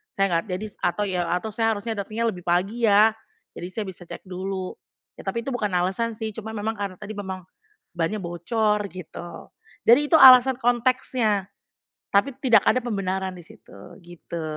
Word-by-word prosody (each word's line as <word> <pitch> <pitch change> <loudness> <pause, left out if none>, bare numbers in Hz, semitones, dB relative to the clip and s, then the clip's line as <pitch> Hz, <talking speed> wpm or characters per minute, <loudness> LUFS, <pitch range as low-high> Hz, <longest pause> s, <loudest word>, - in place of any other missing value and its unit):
saya 195 - +2
nggak 165 0 +1
jadi 185 +2 -4
atau 205 +4 0
ya 185 -3 -1
atau 180 +5 -2
saya 225 +1 +1
harusnya 210 +3 -5
datengnya 220 +3 -1
lebih 180 -5 -8
pagi 195 +7 +1
ya, 210 +2 +6 0.5
jadi 175 - -5
saya 215 -2 -3
bisa 180 -1 -11
cek - - -8
dulu. 185 0 -5 0.5
Ya - - -11
tapi 235 -1 -2
itu 270 - -4
bukan 245 -4 -1
alasan 190 +6 0
sih 220 0 -4
cuma 220 +1 -7
memang 220 +1 -3
karena 200 -2 -4
tadi 210 0 -7
memang 190 -2 -5 0.5
bannya 175 +5 -2
bocor 210 +5 0
gitu. 175 -1 -9 0.3
Jadi 240 +5 +6
itu - - +7
alasan 260 -2 +9
konteksnya 240 -4 +1 0.6
tapi 245 +7 +2
tidak 230 -6 +5
ada 255 - +4
pembenaran 190 -4 -2
di 175 - -11
situ - - -17 0.3
gitu, 170 -1 -8
205 Hz, 175 wpm, -24 LUFS, 185-230 Hz, 0.6 s, alasan